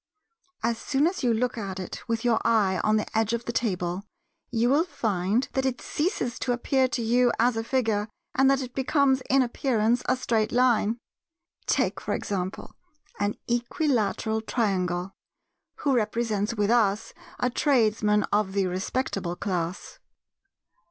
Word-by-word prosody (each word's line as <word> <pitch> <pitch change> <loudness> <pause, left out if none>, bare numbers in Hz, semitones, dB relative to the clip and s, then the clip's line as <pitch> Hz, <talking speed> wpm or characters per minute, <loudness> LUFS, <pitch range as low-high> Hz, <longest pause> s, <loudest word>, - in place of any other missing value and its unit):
As 230 0 0
soon 280 +2 +1
as 355 +3 0
you 245 - +3
look 235 +1 0
at 195 -2 -5
it 185 - -6
with 230 0 -2
your 235 -2 +3
eye 200 -5 +2
on 215 0 +3
the 215 - -1
edge 220 0 +2
of 235 0 -2
the - - -2
table, 185 -6 -1 0.5
you 235 0 +1
will 285 +6 +4
find 220 - -1
that 265 - 0
it 260 -2 -1
ceases 295 - -2
to 245 - 0
appear 260 +2 +1
to 245 -2 -2
you 245 +2 +3
as 240 +1 +3
a 225 - -1
figure, 225 -4 0 0.3
and 265 +1 +4
that 275 0 +2
it 250 -1 -8
becomes 265 0 +2
in 270 0 +5
appearance 240 -1 +1
a 255 - +3
straight 225 -3 0
line. 235 -3 +3 0.7
Take - - +1
for - - -2
example 190 -2 -4 0.5
an 205 0 0
equilateral 235 - 0
Triangle—who 195 +5 -3
represents 220 -1 0
with 210 0 +1
us 215 -4 +2 0.3
a 250 - +1
Tradesman 215 -6 +2
of 205 -2 +1
the 195 -1 +1
respectable 185 -1 -2
class. 180 - -4
230 Hz, 150 wpm, -26 LUFS, 205-250 Hz, 0.7 s, in